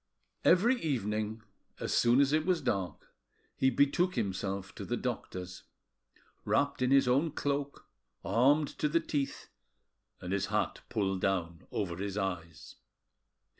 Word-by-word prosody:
Every 235 +8 +4
evening 110 -6 -2 0.4
as - - -2
soon 120 +3 +5
as 140 +1 +2
it 155 0 +3
was 180 0 +2
dark 95 -4 -3 0.4
he 130 - +3
betook 145 +8 +2
himself 95 -1 -2
to - - -7
the - - -2
doctor's, 90 0 -5 0.8
wrapped 145 -1 +1
in 125 - +2
his 135 -1 +5 0.3
cloak, 140 0 -2 0.4
armed 140 +7 +3
to 150 - +1
the 165 +3 +3
teeth, 145 -4 -3 0.7
and 90 +1 -4
his 100 -1 0
hat 105 +1 -1
pulled 95 -4 -1
down 85 -4 -1
over 90 -5 -3
his 100 +1 -4
eyes. 90 -5 -4
110 Hz, 130 wpm, -31 LUFS, 95-145 Hz, 0.8 s, soon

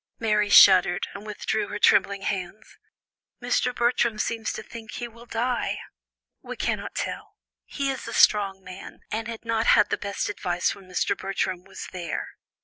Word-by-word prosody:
Mary 210 -2 +1
shuddered, 185 -3 +7
and 200 +2 -9
withdrew 210 +1 -2
her 205 - -5
trembling 200 -1 +3
hands. 195 +2 -4 0.6
"Mr. 250 0 0
Bertram 240 -2 +1
seems 225 0 -2
to - - -6
think 230 -1 -10
he 240 - -4
will 235 +1 -15
die." 240 +2 -1 0.6
"We - - -7
cannot - - -3
tell; - - -5 0.3
he 275 -1 -2
is 265 - -6
a - - -6
strong 195 -2 +3
man 185 0 -10
and 220 +1 -3
had 230 0 -7
not 230 0 0
had 210 - +5
the - - 0
best 200 -1 -3
advice 180 -4 -1
when 195 -2 -15
Mr. 180 - 0
Bertram 185 -2 -3
was 195 - -9
there. 175 -3 -4
210 Hz, 165 wpm, -25 LUFS, 195-230 Hz, 0.6 s, shuddered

